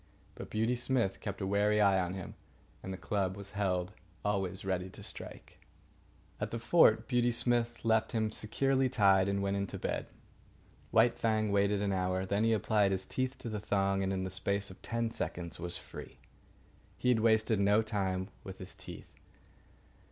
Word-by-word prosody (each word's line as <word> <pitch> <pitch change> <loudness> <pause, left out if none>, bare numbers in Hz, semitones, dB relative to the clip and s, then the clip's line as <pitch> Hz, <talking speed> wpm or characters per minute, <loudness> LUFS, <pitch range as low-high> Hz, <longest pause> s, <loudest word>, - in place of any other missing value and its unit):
But - - -9
Beauty 110 +3 +1
Smith 120 -5 0
kept - - -5
a - - 0
wary 105 +2 +2
eye 100 -2 +5
on 90 0 -2
him, 95 -3 -7 0.5
and 95 - -6
the 95 - -4
club 95 +2 -1
was 100 0 -9
held 95 -2 -1 0.3
always 95 -2 -1
ready 95 -1 -1
to - - -12
strike. - - -9 0.8
At - - -2
the 115 - -3
fort 115 -3 +4
Beauty 120 -1 +2
Smith 120 -1 0
left 110 -1 +2
him 110 -2 0
securely 135 +5 +1
tied 100 -5 +4
and 100 0 0
went 100 0 0
in 100 0 -1
to - - -6
bed. - - -3 0.8
White 120 +2 +4
Fang 110 -2 +1
waited 100 0 +2
an 100 -1 0
hour. 95 0 0
Then 100 +3 0
he 115 0 +3
applied 105 -1 +2
his 95 -1 -1
teeth 130 0 -2
to - - -8
the 105 -1 -3
thong, 100 -1 +1
and 95 0 0
in 95 -1 -1
the 95 - -4
space 100 +1 -1
of 95 - -14
ten 115 -1 -2
seconds 85 -6 -4
was 85 0 -1
free. - - -10 0.8
He 125 - 0
had 120 -3 +4
wasted 110 -1 +3
no 105 +2 +4
time 95 -3 -2
with 95 0 -8
his 95 0 -5
teeth. - - -11
100 Hz, 185 wpm, -32 LUFS, 95-110 Hz, 0.8 s, eye